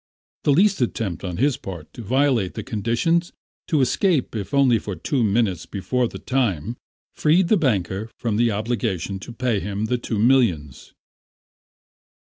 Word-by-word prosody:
The 145 - +4
least 190 +3 +3
attempt 110 -6 -2
on 90 -3 -4
his 135 +1 +2
part 85 -5 -9
to - - -8
violate 125 -3 +1
the 110 - -4
conditions, 115 - 0 0.3
to 155 -5 +2
escape 145 - +1
if 100 -3 -4
only 135 -5 +4
for 100 -2 -5
two 125 - -1
minutes 100 -5 +1
before 120 +6 -1
the - - -8
time 115 - -1 0.4
freed 170 +3 +3
the - - +5
banker 105 - 0
from 110 -3 -1
the 120 +1 +3
obligation 105 -3 -2
to 95 - -9
pay 120 -3 0
him 100 +3 -3
the 125 +2 -1
two 115 -2 -3
millions. 105 - +1
115 Hz, 155 wpm, -22 LUFS, 100-130 Hz, 0.4 s, the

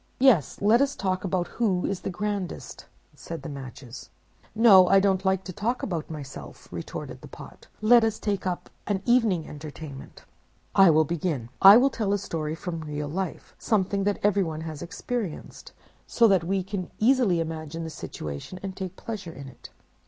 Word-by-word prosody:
"'Yes, 245 - +4
let 225 +5 +5
us 280 0 +1
talk 185 -1 -2
about 180 -2 -1
who 195 -6 0
is 195 - -2
the - - -4
grandest,' 200 0 -4 0.3
said 160 +3 -8
the 165 - -6
Matches. 130 -2 -9 0.5
"'No, 205 -5 +7
I 195 - +6
don't 190 -1 +1
like 190 -1 +1
to 185 - -7
talk 235 +7 -2
about 170 -6 -3
myself,' 145 -4 -9
retorted - - -7
the - - -10
Pot. - - -13
'Let 235 +2 +6
us 220 -1 0
get 200 -3 -2
up 180 -1 -4 0.2
an 200 -2 -1
evening 225 -10 +2
entertainment. 150 -2 -10 0.5
I 195 -2 +7
will 160 0 +4
begin. 150 -7 -2
I 195 +3 +11
will 270 +3 +4
tell 205 -3 -1
a - - +2
story 160 -5 -4
from 165 -1 -5
real 150 -1 -4
life, 185 +2 -5
something 200 -2 0
that 205 -1 +1
everyone 190 -6 +1
has 160 -2 -6
experienced, 195 +2 -5 0.4
so 235 - +4
that 190 -4 +3
we 190 +1 0
can 190 -1 -5
easily 225 -6 +3
imagine 165 0 -4
the 160 - -6
situation, 75 - -7
and 190 -1 -5
take 190 -1 -6
pleasure 205 -7 -6
in 140 -3 -10
it. 130 - -13
185 Hz, 175 wpm, -26 LUFS, 160-205 Hz, 0.5 s, I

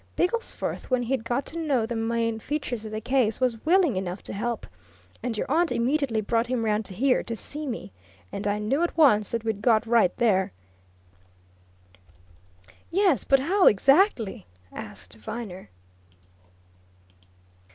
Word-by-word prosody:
Bigglesforth, 455 +7 -1
when 255 -1 +1
he'd 245 -1 -1
got 240 +4 -1
to 335 - -7
know 275 -8 +1
the 235 +1 -4
main 230 0 -1
features 250 -4 -4
of 215 - -6
the 215 - -3
case, 245 -3 +1
was 245 -4 0
willing 340 - +4
enough 185 0 -4
to - - -5
help, 230 +3 -3 0.6
and 235 -2 -3
your - - -1
aunt 325 +5 +2
immediately 250 -2 +1
brought 230 +2 0
him 245 -2 -1
round 215 -1 0
here 250 +8 +1
to 230 - -5
see 295 +7 -5
me. 225 - -5 0.4
And 200 - -3
I 205 0 +1
knew 225 +9 0
at 345 - -1
once 215 -10 +5
that 230 -1 -2
we'd 220 -3 -2
got 225 0 +3
right 225 -6 +3
there!" 190 - +2 2.4
"Yes 365 - +2
but 275 -1 +3
how, 370 +7 +3
exactly?" 250 - +3 0.2
asked - - -9
Viner. 185 - -7
235 Hz, 150 wpm, -26 LUFS, 215-275 Hz, 2.4 s, once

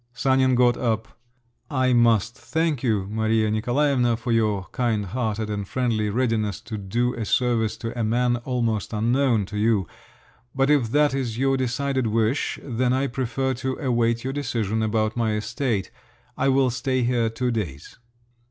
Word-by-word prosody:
Sanin 130 +1 +3
got 120 0 +4
up. 110 -3 -2 0.5
"I 130 -3 +2
must 115 -2 +3
thank 160 -5 -1
you, 110 -6 0
Maria 110 0 +1
Nikolaevna, 120 +1 +1
for 120 +1 -3
your 105 -4 +1
kindhearted 110 -1 -1
and 100 -2 -4
friendly 115 -4 0
readiness 110 -3 0
to 110 -1 -6
do 120 +6 -1
a 115 - -4
service 115 -1 +1
to 115 0 -5
a 120 - -1
man 120 +2 +1
almost 120 -4 -2
unknown 115 0 +2
to 105 +2 -5
you. 105 -3 +2 0.7
But 135 +2 +2
if 135 -7 +3
that 145 +2 +3
is 125 -5 -2
your 135 +1 +2
decided 130 0 -1
wish, 115 +4 0
then 125 -1 0
I 135 +1 +1
prefer 130 +1 -1
to 130 +1 -3
await 120 -4 0
your 130 +1 -3
decision 110 -6 -1
about 110 0 0
my 115 -2 0
estate—I 115 - -3
will 130 -1 +3
stay 130 +1 -1
here 120 -2 +1
two 125 +2 -2
days." 85 - -5
120 Hz, 155 wpm, -24 LUFS, 110-130 Hz, 0.7 s, got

